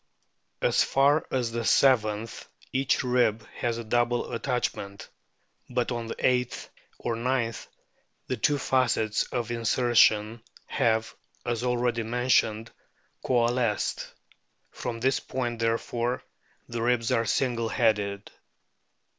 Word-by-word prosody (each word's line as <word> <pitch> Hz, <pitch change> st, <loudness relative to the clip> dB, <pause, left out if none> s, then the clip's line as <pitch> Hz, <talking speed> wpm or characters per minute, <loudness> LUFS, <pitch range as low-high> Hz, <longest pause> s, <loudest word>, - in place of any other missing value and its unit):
As -, -, +4 dB
far 140 Hz, +3 st, +3 dB
as 125 Hz, -3 st, -1 dB
the 115 Hz, 0 st, -3 dB
seventh 110 Hz, -4 st, +2 dB, 0.2 s
each 135 Hz, 0 st, +1 dB
rib 120 Hz, -4 st, +1 dB
has 115 Hz, -1 st, -2 dB
a 115 Hz, -, -5 dB
double 120 Hz, +2 st, 0 dB
attachment, 115 Hz, -5 st, -3 dB, 0.6 s
but 125 Hz, 0 st, -1 dB
on 120 Hz, -1 st, -3 dB
the -, -, -5 dB
eighth; 125 Hz, -1 st, 0 dB, 0.3 s
or 115 Hz, -, -2 dB
ninth 115 Hz, -1 st, -1 dB, 0.6 s
the 130 Hz, -, -2 dB
two 145 Hz, +5 st, +1 dB
facets 120 Hz, -5 st, +1 dB
of 120 Hz, -1 st, -3 dB
insertion 115 Hz, -1 st, +3 dB, 0.2 s
have, 110 Hz, -1 st, 0 dB, 0.3 s
as 120 Hz, -1 st, -1 dB
already 120 Hz, -1 st, 0 dB
mentioned, 115 Hz, -1 st, +1 dB, 0.5 s
coalesced; 120 Hz, -3 st, 0 dB, 0.6 s
from 120 Hz, -2 st, -5 dB
this 130 Hz, +3 st, +2 dB
point, 120 Hz, -3 st, -4 dB
therefore, 115 Hz, +2 st, -1 dB, 0.4 s
the 120 Hz, -1 st, -4 dB
ribs 120 Hz, -1 st, +1 dB
are 115 Hz, -, +2 dB
single 115 Hz, -1 st, 0 dB
headed. 105 Hz, -4 st, 0 dB
120 Hz, 115 wpm, -27 LUFS, 115-125 Hz, 0.6 s, As